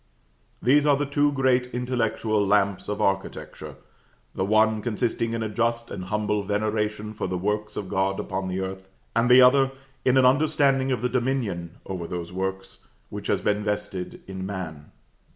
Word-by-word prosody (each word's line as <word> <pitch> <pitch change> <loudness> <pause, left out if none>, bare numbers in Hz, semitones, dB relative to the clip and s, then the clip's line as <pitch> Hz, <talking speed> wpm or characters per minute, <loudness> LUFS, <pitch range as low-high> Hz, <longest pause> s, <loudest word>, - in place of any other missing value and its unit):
These 145 +5 +4
are 145 -1 +5
the 145 - 0
two 145 +1 +2
great 130 -2 +2
intellectual 120 -4 0
Lamps 100 -1 +1
of 105 - -2
Architecture; 95 0 -3 0.6
the - - -1
one 110 +2 +3
consisting 115 0 -1
in 115 -1 -2
a - - -1
just 115 +2 -1
and 90 - -5
humble 105 +1 0
veneration 105 +1 -1
for - - -3
the 90 - -2
works 105 +3 -2
of 100 - -3
God 95 +1 0
upon 95 0 -3
the 95 +1 -2
earth, 95 0 -6 0.3
and 115 +2 +3
the 125 +1 +9
other 135 +1 +5 0.3
in 130 +1 +3
an 130 - +5
understanding 135 -1 +3
of 125 -2 -1
the - - +3
dominion 120 -10 -2
over 90 -3 -5
those 85 0 -5
works 95 +1 -4 0.3
which - - -6
has - - +1
been 105 0 0
vested 105 -3 -4
in 95 -1 -6
man. 90 -7 -6
105 Hz, 170 wpm, -25 LUFS, 95-125 Hz, 0.6 s, the